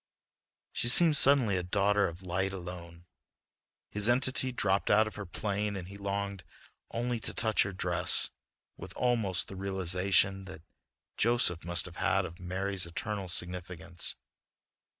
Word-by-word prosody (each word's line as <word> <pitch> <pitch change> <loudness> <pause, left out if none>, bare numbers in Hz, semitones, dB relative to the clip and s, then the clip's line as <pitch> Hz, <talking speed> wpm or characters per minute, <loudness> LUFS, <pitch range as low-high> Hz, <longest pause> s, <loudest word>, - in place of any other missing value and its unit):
She - - -1
seemed 160 +5 +6
suddenly 130 -9 +5
a - - -1
daughter 100 +2 +1
of 85 +2 -8
light 95 +2 -2
alone. 85 -2 -9 0.9
His 105 +2 0
entity 130 +1 +1
dropped 100 -5 0
out 110 +1 +5
of 110 - -6
her 100 -3 -7
plane 105 +2 -2
and 90 -1 -7
he 100 - -10
longed 100 -1 -4 0.5
only 120 0 -2
to - - -6
touch 110 -2 +2
her 100 - 0
dress 90 -2 +1 0.5
with - - -9
almost 115 -7 0
the 95 - -9
realization 95 0 +1
that 95 -4 -11 0.5
Joseph 115 -7 +2
must 85 -1 0
have - - -11
had - - +1
of 85 +3 -9
Mary's 95 0 -2
eternal 100 +2 -4
significance. 85 -1 -3
95 Hz, 145 wpm, -30 LUFS, 90-105 Hz, 0.9 s, seemed